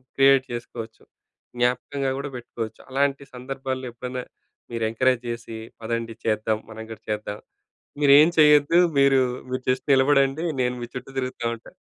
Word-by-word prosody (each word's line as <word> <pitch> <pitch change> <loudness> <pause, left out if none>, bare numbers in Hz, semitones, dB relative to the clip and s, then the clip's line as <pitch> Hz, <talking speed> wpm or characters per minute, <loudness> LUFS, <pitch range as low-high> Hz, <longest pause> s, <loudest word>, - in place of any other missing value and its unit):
Create 135 -1 +5
చేసుకోవచ్చు. 115 -1 -7 0.5
జ్ఞాపకంగా 130 +3 0
గూడా 140 +1 -4
పెట్టుకోవచ్చు. 115 -2 -6
అలాంటి 140 +1 0
సందర్భాల్లో 130 0 -4
ఎప్పుడైనా 125 +1 -5 0.5
మీరెంకరేజ్ 115 +2 +1
చేసి 115 -1 -6 0.2
పదండి 115 0 -3
చేద్దాం. 110 0 +1
మనం 110 0 -8
కూడా 110 0 -9
చేద్దాం. 105 0 -4 0.6
మీరేం 145 +2 +8
చేయొద్దు. 150 +2 +6 0.2
మీరు, 135 -1 +5 0.3
మీరు 130 - -2
జస్ట్ 130 - 0
నిలబడండి 140 +3 +3 0.2
నేను 125 0 0
మీ - - -3
చుట్టూ 125 - -7
తిరుగుతా 130 -2 -4
ఉంటా. 115 - -15
125 Hz, 130 wpm, -24 LUFS, 115-135 Hz, 0.6 s, మీరేం